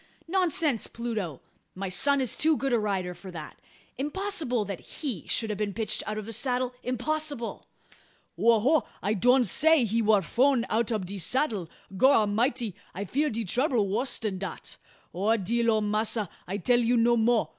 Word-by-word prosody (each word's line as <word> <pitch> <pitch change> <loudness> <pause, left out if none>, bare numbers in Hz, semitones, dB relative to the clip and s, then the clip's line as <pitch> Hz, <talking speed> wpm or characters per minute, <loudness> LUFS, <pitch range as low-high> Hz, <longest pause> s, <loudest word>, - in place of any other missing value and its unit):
Nonsense, 335 - +1
Pluto! 215 - -4 0.3
My 195 +1 -4
son 275 +9 +2
is 255 - 0
too 315 -1 +3
good 270 -2 -1
a 235 - +3
rider 190 -4 -2
for 190 +2 -11
that. 160 -4 -9 0.4
Impossible 300 - -1
that 195 -3 -5
he 250 - -6
should 225 -2 +1
have 210 - -5
been 205 -2 -2
pitched 215 -2 -1
out 215 0 -3
of 215 - -5
the 225 - -6
saddle 250 +2 0
impossible!" 285 +1 -3 0.7
"Ho! 230 -1 +4
ho! 295 +6 +3 0.2
I 205 +3 +1
doan 250 +5 +4
say 295 - +4
he 225 +2 0
war 210 -3 +3
frown 250 - +2
out 230 +1 +1
ob 215 -5 -1
de 195 +2 -5
saddle. 215 - -1 0.3
Gorramity! 230 -1 +2 0.2
I 200 +3 -4
fear 290 - 0
de 230 -1 -3
trouble 240 - +1
wuss 245 +6 0
dan 205 -4 -3
dat. 195 - -6 0.4
O! 210 +6 +1
dear 230 +4 0
ole 220 -1 +3
Massa, 215 -1 0 0.2
I 195 +3 -3
tell 240 +5 +3
you 240 +1 +2
no 235 +1 +4
mo'. 230 0 +2
230 Hz, 175 wpm, -27 LUFS, 205-260 Hz, 0.7 s, Ho